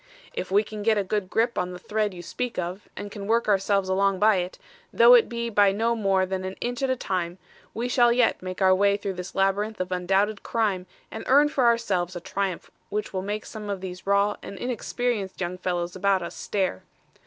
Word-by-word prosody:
"If 185 - -4
we 200 +3 +4
can 215 0 -7
get 220 +1 +3
a 205 - +1
good 195 0 -2
grip 235 +3 +1
on 180 0 -2
the - - -7
thread 210 +3 -1
you 175 -2 -9
speak 250 +7 -4
of, 180 +3 -4
and 205 - -6
can 200 -1 -7
work 230 +1 +2
ourselves 195 -1 +2
along 195 +1 +2
by 210 +1 +4
it, 180 0 -3 0.3
though - - +7
it 480 -2 +6
be 235 -1 -3
by 205 -3 +4
no 225 +4 +1
more 195 -4 +2
than 190 0 -3
an 190 +1 -5
inch 245 +1 -3
at 270 - +1
a 260 - +2
time, 180 -6 -3 0.4
we 235 +2 -1
shall 245 -1 +4
yet 240 -1 +2
make 185 +1 -3
our 185 0 +6
way 200 +1 +3
through 200 -1 -4
this 180 0 -7
labyrinth 200 +3 +1
of 185 0 -3
undoubted 195 +3 +1
crime 200 -5 -1 0.2
and 220 - -6
earn 290 +3 +5
for 275 -5 +1
ourselves 195 -7 +1
a - - -3
triumph 190 0 -3 0.2
which 210 0 -3
will 185 - -1
make 210 +2 -4
some 210 -1 -7
of 200 -1 -2
these 185 0 -8
raw 200 +1 +2
and 200 - -8
inexperienced 240 -4 -2
young 180 0 -3
fellows 175 -1 -2
about 190 -1 +2
us 170 - -6
stare. 190 - -2
200 Hz, 220 wpm, -25 LUFS, 185-220 Hz, 0.4 s, though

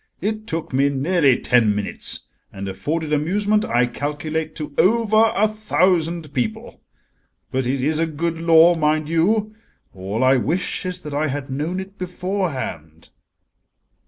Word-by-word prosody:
It 215 +3 -3
took 160 -4 -4
me 140 +2 +3
nearly 140 -1 +2
ten 115 -4 +3
minutes, 105 -1 -1 0.3
and 100 0 -6
afforded 150 - -3
amusement, 205 +8 +1
I 120 - +2
calculate, 155 +4 -4
to 150 -2 -6
over 220 +1 +4
a 215 +2 +3
thousand 175 -7 0
people. 120 -5 -3 0.7
But 130 -1 -1
it 130 0 -1
is 155 +2 +1
a 165 - +1
good 165 +1 -3
law, 165 +1 +6
mind 155 -1 0
you: 210 +6 +1 0.4
all 100 +5 -3
I 130 +1 +5
wish 180 +7 -2
is 180 0 -3
that 150 - -7
I 150 +2 0
had 140 -1 -4
known 155 +7 -2
it 195 +1 -9
beforehand." 180 - -4
155 Hz, 145 wpm, -21 LUFS, 135-185 Hz, 0.7 s, law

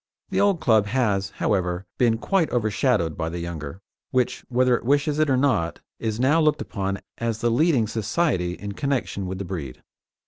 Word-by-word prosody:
The - - +2
old 200 -4 +3
club 110 -7 +3
has, 100 -5 +1
however, 90 -2 -1
been 115 -2 +3
quite 180 - +1
overshadowed 110 - +1
by 80 -1 -2
the 85 - -5
younger, 85 -1 -6 0.3
which, 125 -1 0
whether 125 0 +3
it - - -4
wishes 145 +4 +1
it 155 -1 +3
or 130 - +3
not, 125 -12 +1 0.2
is 110 -1 -2
now 145 +6 +4
looked 155 -1 +3
upon 100 -1 -3 0.2
as 115 -1 -2
the 120 - +2
leading 140 -2 +3
society 110 - 0
in 100 +2 -6
connection 125 -6 -2
with 95 +1 -4
the 100 - -5
breed. 80 -9 -6
110 Hz, 180 wpm, -24 LUFS, 95-130 Hz, 0.3 s, now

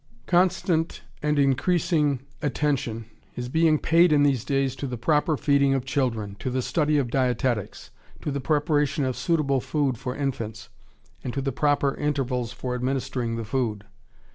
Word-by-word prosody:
] 125 - -34
Constant 175 -2 +1 0.2
and 150 0 +1
increasing 145 0 +2 0.2
attention 135 -6 -1 0.3
is 125 0 -4
being 160 +2 +3
paid 165 +2 +4
in 145 -1 +5
these 135 -5 +2
days 135 -2 0
to 140 - -4
the 125 -1 -4
proper 150 +4 +1
feeding 140 -1 +3
of 130 -1 -2
children, 120 -7 -1
to - - -3
the 130 0 -1
study 150 0 +1
of 130 -5 0
dietetics, 125 -4 -1 0.3
to 150 - -3
the 140 0 -3
preparation 150 0 +1
of 130 -1 -1
suitable 150 -6 +1
food 140 -5 -1
for 125 -1 -4
infants, 115 -6 -4 0.5
and 125 - -4
to - - 0
the 135 0 -1
proper 145 +1 +1
intervals 130 -5 -1
for 125 +1 -4
administering 125 -2 -2
the 115 -1 -4
food. 110 -3 -2
135 Hz, 165 wpm, -25 LUFS, 125-150 Hz, 0.5 s, in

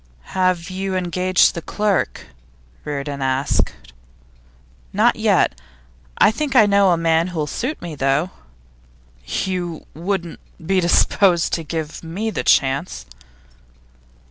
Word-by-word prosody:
'Have 185 -1 0
you 190 0 -3
engaged 185 0 +2
the 170 - -5
clerk?' 205 +2 -1 0.6
Reardon 140 -1 -4
asked. 130 +1 0 1.2
'Not - - +3
yet. - - +1 0.6
I - - +5
think 280 +4 -3
I 225 -4 +7
know 200 -1 +4
a 175 - +3
man 165 0 +2
who'll 165 -4 -2
suit 255 - -4
me, 170 -2 -6
though.' 140 +5 0 1.0
'You 175 - -3
wouldn't 175 0 -3 0.3
be 190 +2 +2
disposed 175 0 +3
to 165 - -1
give 160 0 -5
me 195 +7 -3
the - - -2
chance? 135 - +1
175 Hz, 115 wpm, -20 LUFS, 160-190 Hz, 1.2 s, I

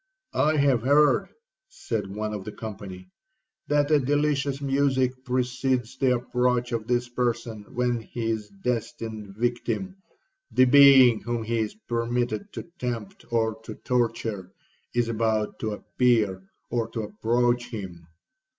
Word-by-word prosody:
'I 155 +1 +2
have 140 -5 +3
heard,' 145 - +4 0.4
said 110 - -4
one 105 +2 -4
of 105 -2 -5
the 105 - -6
company, 95 -4 -8 0.6
'that 145 0 +2
a 150 - +6
delicious 145 0 0
music 135 -2 +2
precedes 125 -1 -1
the 130 -2 +2
approach 125 0 0
of 115 -2 -3
this 120 0 +1
person 120 -3 -2
when 120 -1 +1
his 110 -2 -3
destined 110 -1 -4
victim,—the 190 - -2
being 130 -3 +7
whom 120 -1 -2
he 115 +1 -1
is 110 -1 -2
permitted 120 - -1
to - - -6 0.2
tempt 120 -5 -5
or 110 -1 0
to 110 -1 -8
torture,—is 115 -1 -3
about 110 -2 0
to 110 - -2
appear 105 -5 +1 0.2
or 115 -1 0
to 115 - -4
approach 120 +3 0
him. 90 -7 -7
120 Hz, 125 wpm, -26 LUFS, 110-130 Hz, 0.6 s, being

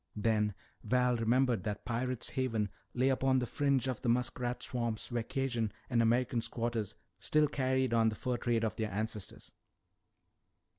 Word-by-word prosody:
Then 105 -1 +1 0.3
Val 125 +2 +2
remembered 120 -2 +2
that 105 -1 -4
Pirate's 125 +1 -1
Haven 115 -6 0 0.3
lay 130 +2 +3
upon 130 0 +3
the 125 - +1
fringe 140 -1 +1
of 130 -3 -2
the 120 - 0
muskrat 125 0 0
swamps 120 -3 -2
where 120 -1 0
Cajun 120 -3 -1 0.2
and 120 -1 +4
American 120 +1 +2
squatters 115 -2 -2 0.2
still 155 +7 +3
carried 130 -3 +1
on 115 -1 +4
the 110 - -4
fur 125 +1 -2
trade 115 -1 0
of 110 - 0
their 110 -1 -2
ancestors. 105 -1 -5
120 Hz, 155 wpm, -33 LUFS, 110-130 Hz, 0.3 s, and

